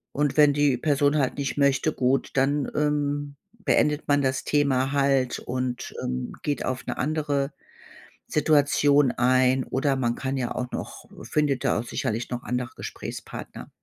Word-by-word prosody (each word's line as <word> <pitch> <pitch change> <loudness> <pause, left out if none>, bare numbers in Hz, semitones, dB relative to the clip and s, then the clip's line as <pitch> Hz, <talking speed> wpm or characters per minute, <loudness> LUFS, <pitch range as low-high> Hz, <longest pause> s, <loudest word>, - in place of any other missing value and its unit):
Und 145 +1 0
wenn 145 -1 +6
die 145 -3 +2
Person 145 +1 +2
halt 135 -1 0
nicht 140 0 -3
möchte, 140 +2 +2
gut, 130 +1 0
dann, 140 +1 +1
ähm, 145 -1 -1 0.2
beendet 150 -7 +1
man 145 0 +3
das 130 -1 0
Thema 135 -2 +2
halt 135 -3 +2
und, 125 -1 -4
ähm, 125 0 -3
geht 145 -2 -2
auf 130 0 -3
'ne - - -3
andere 145 -1 -1 0.8
Situation 145 -2 +3
ein. 130 +1 +3
Oder 135 +1 0
man 120 -2 0
kann 135 0 -3
ja 125 -2 -2
auch 125 0 -3
noch - - -6 0.2
findet 140 +1 0
da - - +2
auch - - -3
sicherlich 120 -2 -3
noch 125 0 -4
andere 125 0 -3
Gesprächspartner. - - -8
140 Hz, 155 wpm, -25 LUFS, 130-145 Hz, 0.8 s, wenn